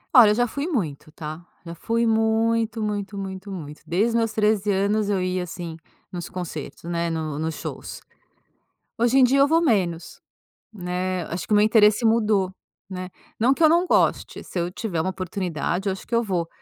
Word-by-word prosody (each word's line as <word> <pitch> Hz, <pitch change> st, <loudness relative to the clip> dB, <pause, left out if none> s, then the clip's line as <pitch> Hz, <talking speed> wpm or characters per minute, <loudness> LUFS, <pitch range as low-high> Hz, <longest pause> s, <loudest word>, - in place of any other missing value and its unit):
Olha, 240 Hz, -5 st, +9 dB
eu 210 Hz, -, +3 dB
já 245 Hz, +2 st, +2 dB
fui 280 Hz, +6 st, -4 dB
muito, 160 Hz, -, -3 dB
tá, 155 Hz, +1 st, -7 dB, 0.2 s
já 170 Hz, -, -6 dB
fui 230 Hz, +7 st, 0 dB
muito, 225 Hz, 0 st, +1 dB
muito, 205 Hz, -1 st, -3 dB
muito, 190 Hz, 0 st, -6 dB
muito. 150 Hz, -5 st, -8 dB
Desde 200 Hz, +7 st, +2 dB
os -, -, -3 dB
meus 225 Hz, -1 st, +1 dB
13 210 Hz, -2 st, +1 dB
anos, 200 Hz, +2 st, +1 dB
eu 200 Hz, -2 st, +1 dB
ia, 185 Hz, 0 st, -1 dB
assim, 175 Hz, -2 st, -6 dB, 0.4 s
nos 175 Hz, -2 st, -6 dB
concertos, 175 Hz, -5 st, -6 dB
né, 170 Hz, 0 st, -1 dB
no 155 Hz, -3 st, -3 dB
nos 160 Hz, 0 st, -2 dB
shows. -, -, -7 dB, 1.0 s
Hoje 240 Hz, +3 st, +3 dB
em -, -, +6 dB
dia 260 Hz, +2 st, +4 dB
eu 275 Hz, -, +6 dB
vou 325 Hz, +3 st, +3 dB
menos, 180 Hz, -, 0 dB, 0.5 s
né, 180 Hz, -2 st, -3 dB
acho 175 Hz, -, -4 dB
que -, -, -14 dB
o -, -, +6 dB
meu 210 Hz, -, +5 dB
interesse 215 Hz, +1 st, +4 dB
mudou, 215 Hz, -4 st, +3 dB, 0.4 s
né. 185 Hz, -1 st, -6 dB, 0.3 s
Não 245 Hz, +4 st, +4 dB
que 305 Hz, -, -8 dB
eu 315 Hz, -, +8 dB
não 340 Hz, +3 st, +4 dB
goste, -, -, +1 dB
se -, -, -8 dB
eu 175 Hz, 0 st, -1 dB
tiver 180 Hz, -4 st, -2 dB
uma 185 Hz, -, -1 dB
oportunidade 185 Hz, 0 st, -2 dB
eu -, -, +1 dB
acho 190 Hz, -, -7 dB
que 235 Hz, -, -1 dB
eu 230 Hz, -, +3 dB
vou, 180 Hz, -6 st, -1 dB
195 Hz, 200 wpm, -24 LUFS, 175-225 Hz, 1.0 s, Olha